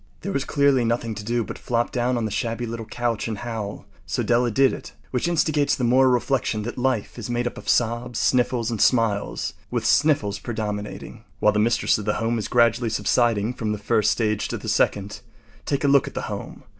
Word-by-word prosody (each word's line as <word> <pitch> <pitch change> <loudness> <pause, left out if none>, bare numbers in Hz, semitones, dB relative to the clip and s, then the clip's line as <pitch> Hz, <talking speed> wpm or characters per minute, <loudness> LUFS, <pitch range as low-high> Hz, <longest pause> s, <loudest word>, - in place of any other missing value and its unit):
There 200 - -4
was 140 -6 -1
clearly 140 -3 +3
nothing 115 0 -1
to 105 0 -7
do 120 +2 0
but - - -8
flop 120 -1 -1
down 125 -1 0
on 115 - -1
the 110 - -3
shabby 115 +2 -2
little 115 -1 -6
couch 120 -2 -2
and 110 -2 -3
howl. 110 -3 -5 0.2
So - - -1
Della 120 0 +2
did 135 +4 +3
it. - - -8 0.2
Which 125 +5 0
instigates 155 -3 +2
the 125 - -4
moral 130 +2 +4
reflection 125 -3 0
that 120 - -5
life 125 -3 -1
is 115 - -6
made 120 0 -1
up 120 - -3
of - - -7
sobs, 120 0 +1
sniffles, 120 -1 +1
and 110 - -2
smiles, 115 -5 +1 0.2
with - - -2
sniffles 140 -10 +2
predominating. 105 -3 -5 0.2
While 105 - +4
the 105 - +1
mistress 115 0 +2
of 105 - -6
the 105 - 0
home 115 0 0
is 105 - -3
gradually 115 -1 +3
subsiding 110 +1 +1
from 110 -3 -2
the - - -3
first 105 0 +1
stage 110 -2 0
to - - -3
the - - -9
second, 100 0 0 0.5
take 140 0 0
a - - +3
look 140 -1 +4
at - - -8
the - - -2
home. - - -6
120 Hz, 215 wpm, -23 LUFS, 110-125 Hz, 0.5 s, moral